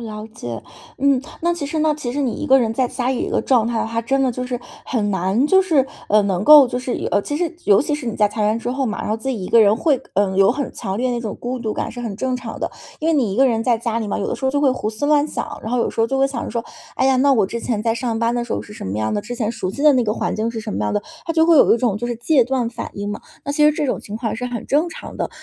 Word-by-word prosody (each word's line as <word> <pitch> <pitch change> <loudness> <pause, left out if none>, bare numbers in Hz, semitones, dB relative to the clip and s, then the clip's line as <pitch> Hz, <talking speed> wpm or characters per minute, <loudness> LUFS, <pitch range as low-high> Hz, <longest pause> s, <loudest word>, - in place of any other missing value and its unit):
了 215 -2 -6
解。 120 - -6 0.4
嗯， 275 -1 +3 0.2
那 345 +1 +2
其 340 -4 -4
实 310 +2 -2
呢 310 0 +3
其 250 -5 -4
实 285 - -2
你 250 -4 -1
一 - - -4
个 265 0 +6
人 225 -2 0
在 255 +2 +1
家 245 0 -3
里 260 -1 0
一 - - -2
个 - - 0
状 240 -4 +3
态 230 -1 -1
的 - - -1
话， 230 +1 -2
真 270 +4 0
的 260 - +2
就 250 +1 -4
是 250 -1 -3 0.3
很 210 -5 -1
难 190 +6 +1
就 380 +5 +5
是， 325 -8 +2 0.2
呃， 210 0 +4
能 195 -1 -1
够 295 -2 +9
就 245 0 -2
是， 250 0 -3 0.2
呃， 205 - +3
其 290 +8 -4
实 345 +1 -1
尤 200 +2 +5
其 295 - -3
是 295 -4 -5
你 230 - -2
在 210 -1 +3
裁 210 +1 -2
员 215 +1 +2
之 240 - -3
后 265 +1 -1
嘛， 220 0 -3
然 - - -3
后 215 - +1
自 225 +4 -6
己 225 -8 -2
一 - - -5
个 230 - +6
人 210 0 +5
会， 280 0 +1
呃， 190 -1 +1
有 195 +2 +5
很 280 -1 -4
强 195 -4 -4
烈 250 +3 0
那 240 -1 -2
种 220 -3 -5
孤 250 +1 -3
独 225 -3 -3
感 - - -3
是 245 - -8
很 230 -4 -4
正 255 +5 -1
常 - - -8
的。 - - -2 0.3
因 315 - 0
为 - - +3
你 245 -9 +1
一 - - -5
个 265 - +5
人 225 -2 0
在 245 -2 +3
家 230 0 -2
里 225 - -3
嘛， 205 - -2
有 200 - -2
的 - - -2
时 - - -6
候 265 - +3
就 285 - +1
会 285 -2 +4
胡 255 -4 -2
思 220 +5 -4
乱 295 0 +3
想， - - -5
然 220 - -5
后 250 - +1
有 235 - +1
时 - - -3
候 225 - +4
就 270 - -1
会 270 0 +3
想 260 -4 -4
着 - - -5
说： 235 -1 -3 0.3
“哎 - - 0
呀， 265 - +4
那 275 +2 +4
我 220 -6 +3
之 235 +5 -4
前 230 -2 -2
在 225 0 +1
上 235 -1 -2
班 230 0 +1
的 240 0 -1
时 235 - -5
候 - - -2
是 210 - -12
什 210 - -8
么 95 - -3
样 110 0 -1
的， 205 - 0
之 235 +4 -6
前 225 -2 -1
熟 225 -5 -4
悉 275 +9 -5
的 300 -1 +7
那 250 -2 +2
个 210 - 0
环 - - -2
境 220 +1 -1
是 230 -1 -5
什 215 -1 -5
么 - - -3
样 105 - -1
的”， 205 - 0 0.2
他 330 - -1
就 320 0 +4
会 330 -1 +5
有 - - +6
一 - - +1
种 235 -4 0
就 240 - -3
是 240 - -2
戒 250 +3 +3
断 250 -2 -1
反 245 - -6
应 205 0 -4
嘛， 205 - -5 0.2
那 285 - -3
其 300 +1 +3
实 300 - +6
这 300 - -2
种 265 - -1
情 210 - -7
况 225 -1 -3
是 250 - -3
很 245 -3 -5
正 305 +5 +2
常 330 - -9
的。 - - -2
240 Hz, 370 characters per minute, -20 LUFS, 215-270 Hz, 0.4 s, 够